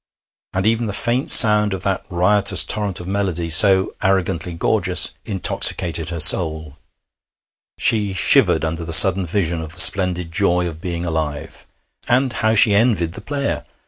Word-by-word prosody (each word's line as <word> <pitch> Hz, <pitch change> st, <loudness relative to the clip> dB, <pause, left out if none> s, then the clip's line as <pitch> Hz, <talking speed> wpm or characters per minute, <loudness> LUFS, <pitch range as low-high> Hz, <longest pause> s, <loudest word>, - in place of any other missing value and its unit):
And 95 Hz, +1 st, -4 dB
even 115 Hz, +1 st, -2 dB
the 100 Hz, -, -6 dB
faint 120 Hz, +5 st, -2 dB
sound 105 Hz, -3 st, +6 dB
of 95 Hz, -, -8 dB
that 95 Hz, -1 st, -4 dB
riotous 100 Hz, +3 st, +1 dB
torrent 105 Hz, -3 st, -4 dB
of 90 Hz, -, -11 dB
melody, 95 Hz, -4 st, -4 dB
so 95 Hz, +2 st, +3 dB
arrogantly 95 Hz, -3 st, -3 dB
gorgeous, 85 Hz, -, -1 dB
intoxicated 85 Hz, -4 st, 0 dB
her 85 Hz, -1 st, -7 dB
soul. 80 Hz, -2 st, +1 dB, 1.0 s
She 105 Hz, -3 st, 0 dB
shivered 90 Hz, -, +2 dB
under 80 Hz, +1 st, -6 dB
the 80 Hz, 0 st, -3 dB
sudden 95 Hz, +2 st, +5 dB
vision 85 Hz, -2 st, -3 dB
of 80 Hz, 0 st, -11 dB
the 95 Hz, -, -5 dB
splendid 90 Hz, -3 st, +2 dB
joy 90 Hz, +2 st, -2 dB
of 80 Hz, -2 st, -9 dB
being 85 Hz, -1 st, -7 dB
alive. 80 Hz, -3 st, -7 dB, 0.4 s
And 125 Hz, +1 st, -1 dB
how 110 Hz, 0 st, -2 dB
she 105 Hz, 0 st, +5 dB
envied 100 Hz, -6 st, -1 dB
the -, -, -11 dB
player! 140 Hz, -1 st, -6 dB
95 Hz, 155 wpm, -16 LUFS, 85-105 Hz, 1.0 s, sound